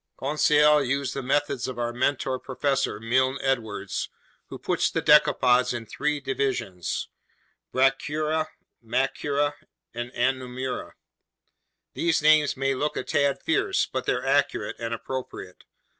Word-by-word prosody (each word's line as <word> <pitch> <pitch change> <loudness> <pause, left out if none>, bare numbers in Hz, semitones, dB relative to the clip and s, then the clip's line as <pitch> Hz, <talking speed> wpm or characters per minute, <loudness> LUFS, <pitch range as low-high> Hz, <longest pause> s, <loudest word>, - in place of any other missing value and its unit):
Conseil 150 +1 +4
used 135 0 -1
the 135 - -3
methods 140 0 0
of 130 -2 -6
our 120 0 -2
mentor 130 +1 0
Professor 135 -4 -1
Milne 130 +4 +1
Edwards, 110 -7 -2 0.4
who - - -8
puts - - 0
the - - -1
decapods 125 -4 +4
in 115 -1 -5
three 150 +6 -2
divisions: 130 -9 -2 0.6
Brachyura, 150 +4 +1 0.4
Macrura, 140 +4 0 0.4
and 120 +1 -5
Anomura. 130 0 -2 1.0
These 165 -3 +1
names 155 -2 +4
may 135 0 +1
look 150 +3 -2
a - - -2
tad 140 -1 0
fierce, - - +1
but - - -5
they're - - 0
accurate - - +1
and 115 0 -4
appropriate. 115 -5 -6
135 Hz, 125 wpm, -26 LUFS, 125-145 Hz, 1.0 s, Conseil